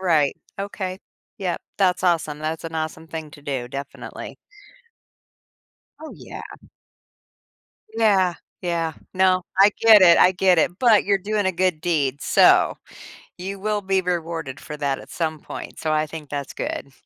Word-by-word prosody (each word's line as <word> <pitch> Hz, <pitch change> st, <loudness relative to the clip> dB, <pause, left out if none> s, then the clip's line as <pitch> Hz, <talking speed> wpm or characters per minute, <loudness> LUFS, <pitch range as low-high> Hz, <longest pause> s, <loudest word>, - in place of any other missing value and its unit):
right, 160 Hz, -6 st, +2 dB, 0.2 s
okay, 190 Hz, -2 st, -4 dB, 0.4 s
yep, 185 Hz, -3 st, -2 dB, 0.2 s
that's 185 Hz, -2 st, +2 dB
awesome, 165 Hz, -4 st, +1 dB
that's 155 Hz, +2 st, -4 dB
an 165 Hz, 0 st, -6 dB
awesome 160 Hz, 0 st, -4 dB
thing 160 Hz, -2 st, -7 dB
to 145 Hz, -, -14 dB
do, 130 Hz, -4 st, -3 dB
definitely. 140 Hz, +1 st, -8 dB, 1.6 s
Oh, 315 Hz, 0 st, -9 dB
yeah. -, -, -10 dB, 1.5 s
Yeah, 195 Hz, -6 st, +3 dB, 0.3 s
yeah. 165 Hz, -2 st, -1 dB, 0.2 s
No, 185 Hz, -1 st, +3 dB, 0.2 s
I 200 Hz, +2 st, +7 dB
get 220 Hz, -3 st, +8 dB
it, 170 Hz, -2 st, +7 dB
I 185 Hz, -, +6 dB
get 180 Hz, -1 st, +3 dB
it. 175 Hz, +3 st, +1 dB
But 230 Hz, -5 st, +5 dB
you're 200 Hz, 0 st, +2 dB
doing 205 Hz, 0 st, -1 dB
a 190 Hz, -, +1 dB
good 180 Hz, -3 st, 0 dB
deed, 145 Hz, -5 st, 0 dB
so, -, -, +5 dB, 0.6 s
you 195 Hz, +2 st, -6 dB
will 210 Hz, 0 st, -1 dB
be 190 Hz, -1 st, +1 dB
rewarded 165 Hz, -6 st, -3 dB
for 150 Hz, -, -8 dB
that 140 Hz, -2 st, -1 dB
at -, -, -13 dB
some 160 Hz, -2 st, -2 dB
point, -, -, -9 dB
so 155 Hz, -, -1 dB
I 155 Hz, 0 st, +1 dB
think 155 Hz, -2 st, -9 dB
that's 140 Hz, -1 st, -5 dB
good. 140 Hz, -, -5 dB
170 Hz, 155 wpm, -22 LUFS, 155-190 Hz, 1.6 s, get